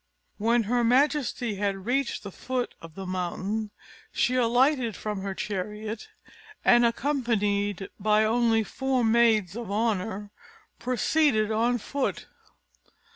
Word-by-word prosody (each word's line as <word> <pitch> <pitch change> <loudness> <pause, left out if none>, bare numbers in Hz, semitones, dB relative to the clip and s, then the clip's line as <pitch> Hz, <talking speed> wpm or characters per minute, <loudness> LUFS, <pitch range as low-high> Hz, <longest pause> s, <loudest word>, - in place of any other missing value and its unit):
When 230 +2 +3
her 240 +3 +1
majesty 250 -3 +1
had 195 -1 -2
reached 265 +2 -1
the 200 - -7
foot 255 +4 -3
of 165 -1 -12
the 195 - -6
mountain, 185 +4 -3 0.4
she 245 - +1
alighted 250 -1 +2
from 210 -2 -4
her 195 0 -4
chariot, 210 +3 -5 0.6
and, 240 0 +6
accompanied 210 -6 0
by 210 +1 +3
only 225 0 +2
four 265 +2 -1
maids 220 -5 +3
of 235 -3 -6
honour, 205 -1 -1 0.5
proceeded 250 -2 +2
on 235 +3 +2
foot. 275 +4 -3
225 Hz, 120 wpm, -27 LUFS, 205-245 Hz, 0.6 s, and